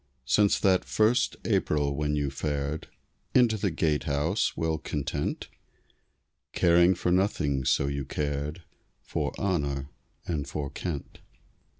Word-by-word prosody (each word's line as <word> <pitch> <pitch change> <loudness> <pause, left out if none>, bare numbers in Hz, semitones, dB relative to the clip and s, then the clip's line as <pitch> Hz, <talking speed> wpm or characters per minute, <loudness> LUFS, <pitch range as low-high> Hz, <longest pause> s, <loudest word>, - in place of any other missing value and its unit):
Since 100 +10 +3
that 95 -2 +4
first 115 +4 +2
April 70 -2 +1
when 75 +1 0
you 70 -2 -1
fared 75 +1 -3 0.5
Into 120 -3 +5
the 100 -2 0
Gatehouse, 75 +2 0
well 80 -1 0
content, 75 -2 -3 1.1
Caring 85 +1 +5
for 90 - -1
nothing 75 -8 +1
so 70 - +3
you 70 0 -2
cared 75 +4 -3 0.4
For - - -2
honor 70 -7 -1 0.3
and 75 -5 -2
for 70 -3 -4
Kent. 80 -6 -5
75 Hz, 115 wpm, -28 LUFS, 70-90 Hz, 1.1 s, Into